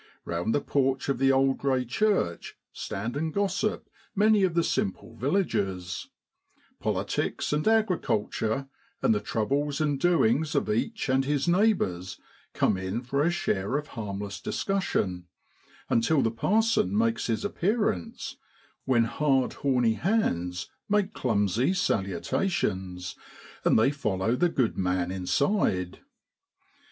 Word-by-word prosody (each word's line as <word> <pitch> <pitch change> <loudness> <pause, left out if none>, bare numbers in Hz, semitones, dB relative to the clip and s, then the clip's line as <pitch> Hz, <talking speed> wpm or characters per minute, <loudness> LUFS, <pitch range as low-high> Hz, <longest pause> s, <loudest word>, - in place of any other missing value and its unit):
Eound 85 +6 -1
the 145 - +1
porch 135 -1 0
of 135 - 0
the 135 0 +4
old 135 0 +2
grey 130 -2 +1
church 125 - 0 0.2
stand 115 +6 -4
and 160 +2 -1
gossip 200 +3 -1 0.3
many 210 +1 +4
of 180 -3 +1
the 170 - +3
simple 100 0 -2
villagers; 100 - -1 0.7
politics - - -1
and 150 +5 0
agriculture 140 - +1 0.4
and - - +4
the 105 - +1
troubles 140 +7 -1
and 145 -3 0
doings 150 -3 +2
of - - +1
each 110 - -1
and 135 0 +2
his 145 +1 0
neighbours, 170 - +1 0.4
come - - +2
in 95 +6 -3
for 140 +3 -1
a 160 - +3
share 105 - -1
of 150 0 -5
harmless 100 -3 -5
discussion, 100 - -1 0.6
until 135 +5 +2
the 115 - +1
parson 210 - +2
makes 115 0 +1
his 115 -2 -1
appearance, 200 - -1 0.5
when 120 -3 +3
hard, 135 +2 +1
horny 125 -5 +2
hands 90 - 0 0.2
make 210 0 +1
clumsy 115 - +1
salutations, 95 - -1 0.5
and - - +4
they 110 +5 +4
follow 110 -5 0
the 175 +5 +2
good 125 -11 0
man 90 -1 0
inside. 95 - 0
130 Hz, 125 wpm, -27 LUFS, 100-160 Hz, 0.7 s, the